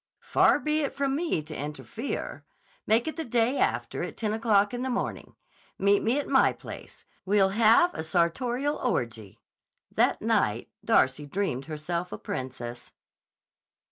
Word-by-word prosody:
"Far - - +4
be 305 0 0
it 280 - -3
from 275 -1 0
me 310 - -1
to 155 0 -9
interfere. 150 - -5 0.4
Make 225 +5 +3
it 315 - -4
the 325 - -2
day 240 +1 +1
after - - 0
at - - -5
ten 215 -2 -1
o'clock 215 -1 +2
in 245 - -3
the 260 - -2
morning. 245 - -3 0.4
Meet 200 +1 +3
me 230 +5 +1
at 290 - -2
my 270 - +4
place. - - -11 0.2
We'll 195 0 +3
have 230 - +5
a - - -4
sartorial 240 - 0
orgy." 115 - -3 0.5
That - - +2
night - - 0
Darcy 135 +3 +2
dreamed 145 -6 -2
herself 170 +3 -4
a - - -5
princess. 120 -2 -6
205 Hz, 150 wpm, -27 LUFS, 155-250 Hz, 0.5 s, have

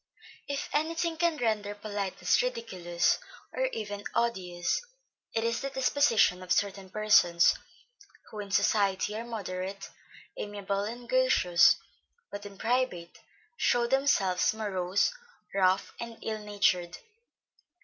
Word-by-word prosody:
_ - - -26 0.2
If 280 -1 -3
any 315 +3 0
thing 330 0 -1
can 335 -1 +1
render 210 -5 -1
politeness 205 - 0
ridiculous, 185 - 0 0.3
and - - 0
even 205 - -5
odious, 180 -7 0 0.5
it 225 - -1
is 230 +1 0
the 275 - -2
disposition 260 -8 +3
of 185 0 -8
certain 195 -1 0
persons, 185 -5 +4 0.8
who 215 - -7
in 205 -1 -6
society 200 0 +2
are 225 - -4
moderate, 195 -4 -5 0.5
amiable, 200 -1 -3
and 240 +3 -7
gracious, 235 -9 +5 0.6
but 205 0 -6
in 200 -1 -13
private 225 -7 -1 0.4
show 240 - +2
themselves 235 -8 +2
morose, 195 - 0 0.4
rough 190 0 +2
and 235 -1 -6
ill 220 -1 -3
natured. 200 -4 0
205 Hz, 120 wpm, -29 LUFS, 190-240 Hz, 0.8 s, gracious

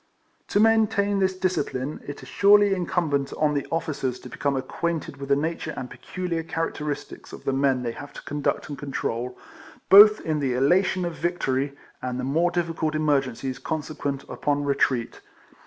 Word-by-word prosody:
To 205 - +1
maintain 215 -2 +3
this 190 -1 +1
discipline 155 -7 -2
it 145 - -7
is - - -11
surely 205 0 +5
incum 175 -3 0
bent 140 -1 0
on 150 -1 +2
the 140 -1 -2
officers 145 -6 -2
to 125 - -10
become 140 +2 -1
acquainted 165 +2 -3
with 140 0 -7
the 140 - +5
nature 160 +1 -3
and 125 - -6
peculiar 180 -3 -4
characteristics 160 -3 -4
of - - -11
the 135 - +1
men 135 -2 +2
they 120 - -2
have 145 +4 -9
to - - -10
conduct 145 -1 -2
and 145 -3 -7
con 140 0 -6
trol, 120 0 -2 0.6
both 210 +2 +10
in 155 -1 -1
the 135 -3 0
elation 180 +7 +2
of 170 - -3
victory 140 -5 -1 0.2
and 125 0 -3
the - - -3
more 160 +7 +2
difficult 165 -3 -1
emergencies 135 -4 0
consequent 145 -2 -3
upon 145 -1 -1
retreat. 135 -4 0
150 Hz, 170 wpm, -25 LUFS, 135-175 Hz, 0.6 s, both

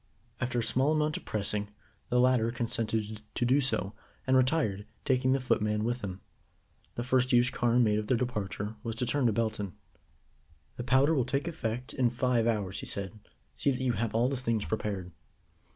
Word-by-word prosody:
After 125 -1 -1
a 120 - +1
small 135 +6 +2
amount 155 0 +1
of - - -11
pressing, 105 0 -1 0.4
the 125 - +3
latter 125 -2 +4
consented 110 -2 -2
to 120 - +1
do 130 +4 +4
so, 105 -6 0 0.3
and 130 - +3
retired, 130 -7 +2 0.2
taking 130 0 +3
the 135 - +2
footman 105 -4 +1
with 120 +1 -2
him. 95 -1 -5 0.7
The 120 - -2
first 130 +1 +2
use 120 0 +4
Carne 120 0 +3
made 105 -1 +2
of 105 - -4
their 125 - +3
departure 105 -3 -3
was 115 0 -4
to 125 - -1
turn 135 0 +2
to - - +3
Belton. 110 -4 -1 1.0
"The 120 - -5
powder 130 +5 +4
will 135 -5 +2
take 140 +5 -1
effect 125 -6 -3
in 125 -3 +2
five 120 -1 +1
hours," 100 -4 -1
he - - -6
said. 100 +2 -4 0.3
"See - - 0
that 130 -2 0
you 130 - +2
have 115 -1 -2
all 120 +2 +3
the 135 0 -1
things 115 -4 -1
prepared." 100 -4 -3
120 Hz, 190 wpm, -30 LUFS, 105-130 Hz, 1.0 s, latter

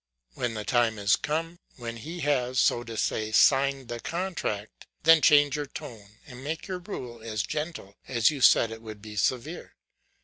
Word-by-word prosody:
When 120 -2 -3
the 105 -1 -5
time 115 -1 +2
is 100 -1 +3
come, 165 +3 -3 0.2
when 115 -2 -6
he 165 +9 -7
has, 130 -4 0
so 120 - +3
to 115 -1 -7
say, 110 0 -1
signed 135 +2 +4
the 120 0 -5
contract, 165 - -4 0.2
then 165 0 +7
change 145 -1 +5
your 145 -1 -3
tone, 110 -5 -10
and 125 -1 -11
make 160 +3 -4
your 185 -2 -4
rule 125 - -7
as 110 -3 -2
gentle 150 - -5
as 120 +2 +3
you 145 -3 -6
said 115 -2 +6
it 115 0 -8
would 110 -2 -10
be 105 -1 -9
severe. 130 - -2
125 Hz, 180 wpm, -27 LUFS, 110-150 Hz, 0.2 s, then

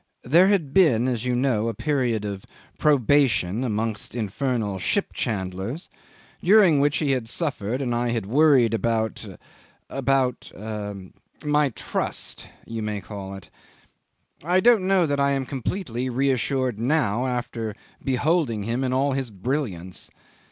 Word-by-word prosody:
There 170 +9 +5
had 175 -9 +1
been, 130 -11 +4
as 120 -2 -2
you 125 -1 +1
know, 120 -4 +1
a 115 - -2
period 125 -6 0
of 100 -2 -5 0.4
probation 130 -7 +3
amongst 110 -2 -2
infernal 110 -2 -2
ship 85 - 0
chandlers, 95 - -3 0.5
during 185 -5 +6
which 145 +2 +2
he 145 -3 +1
had 125 -4 -1
suffered 130 - -2
and 120 -2 -1
I 120 +1 0
had 115 -3 -1
worried 130 -1 +4
about 110 -1 -1 0.7
about 135 -2 0 0.9
my 150 -1 +3
trust 115 - -3 0.2
you 115 -1 -5
may 105 -1 -2
call 100 0 -7
it. 95 - -12 0.9
I 175 +4 +3
don't 220 -3 +4
know 190 -3 +4
that 145 -2 -1
I 140 0 +3
am 135 -1 -1
completely 130 - -3
reassured 130 -2 0
now, 125 -2 +1
after 120 -3 -3 0.3
beholding 135 - +1
him 120 +5 -1
in 130 -1 0
all 140 +2 +2
his 135 -2 -2
brilliance. 100 - -4
125 Hz, 135 wpm, -24 LUFS, 110-145 Hz, 0.9 s, during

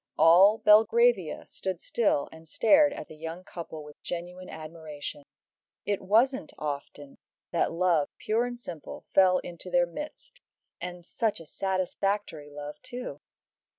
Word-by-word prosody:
All 180 +7 +7
Belgravia 340 - +4
stood 190 -3 -4
still 205 -11 +1
and 160 0 -14
stared 290 - +5
at 155 - -7
the 155 - -11
young 165 +3 -7
couple 165 -4 -8
with 150 0 -14
genuine 180 +1 -6
admiration. 155 -2 -7 0.6
It 205 -1 0
wasn't 225 - +2
often 145 -1 -6 0.3
that 170 - +1
love, 170 -3 +2
pure 225 +3 +1
and 245 -1 -6
simple, 170 -10 -8
fell 185 -1 +6
into 175 +1 -7
their 175 0 +4
midst, 300 - -9 0.4
and 175 0 -6
such 220 +2 -1
a 165 - -11
satisfactory 190 -3 -2
love 145 0 -8
too! 250 0 -7
180 Hz, 135 wpm, -28 LUFS, 160-210 Hz, 0.6 s, All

